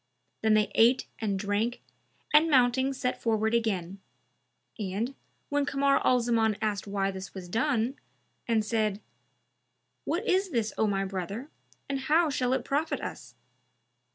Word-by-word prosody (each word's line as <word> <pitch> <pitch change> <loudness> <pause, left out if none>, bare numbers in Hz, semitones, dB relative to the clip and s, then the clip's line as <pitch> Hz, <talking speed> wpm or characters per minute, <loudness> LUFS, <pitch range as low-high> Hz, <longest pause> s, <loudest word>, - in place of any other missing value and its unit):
Then 220 -1 +4
they 215 -1 +2
ate 235 +3 +4
and 205 -3 -1
drank 205 +4 -1 0.5
and 310 +2 +6
mounting 260 -1 +3
set 255 -2 -3
forward 220 -1 +1
again; 195 -5 -1 0.8
and, 210 +6 -2 0.4
when 290 0 +1
Kamar 275 0 +2
al 250 - +4
Zaman 225 -3 +1
asked 210 -2 -2
why 195 -1 0
this 190 0 -8
was 185 -2 -7
done, 235 +4 0 0.5
and 225 -2 +2
said, 215 -2 0 1.0
"What 360 +7 -2
is 380 +1 +2
this 230 -7 -1
O 220 - +2
my 195 -1 0
brother, 195 - -5 0.4
and 275 0 -2
how 310 +3 +3
shall 255 -2 0
it - - -1
profit 295 +3 0
us?" - - -7
225 Hz, 145 wpm, -28 LUFS, 205-270 Hz, 1.0 s, and